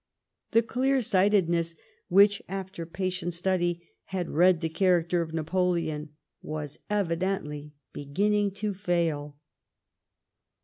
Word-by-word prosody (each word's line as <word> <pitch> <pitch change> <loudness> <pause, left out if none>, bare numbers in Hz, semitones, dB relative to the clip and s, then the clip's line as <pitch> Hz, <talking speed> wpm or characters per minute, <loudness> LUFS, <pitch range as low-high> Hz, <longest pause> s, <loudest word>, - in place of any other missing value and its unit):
The 230 0 +4
clear 260 +4 +1
sightedness 185 -6 +2 0.3
which, 200 +2 +5
after 190 -3 -5
patient 180 0 -3
study, 175 -1 0 0.2
had 185 -3 -3
read 175 +2 +4
the 165 - 0
character 175 0 +2
of 160 -1 -4
Napoleon, 165 -2 -1 0.3
was 150 -1 -5
evidently 170 -6 -2 0.2
beginning 205 +8 +1 0.2
to 205 - 0
fail. 165 -6 -1
175 Hz, 100 wpm, -28 LUFS, 165-195 Hz, 0.3 s, which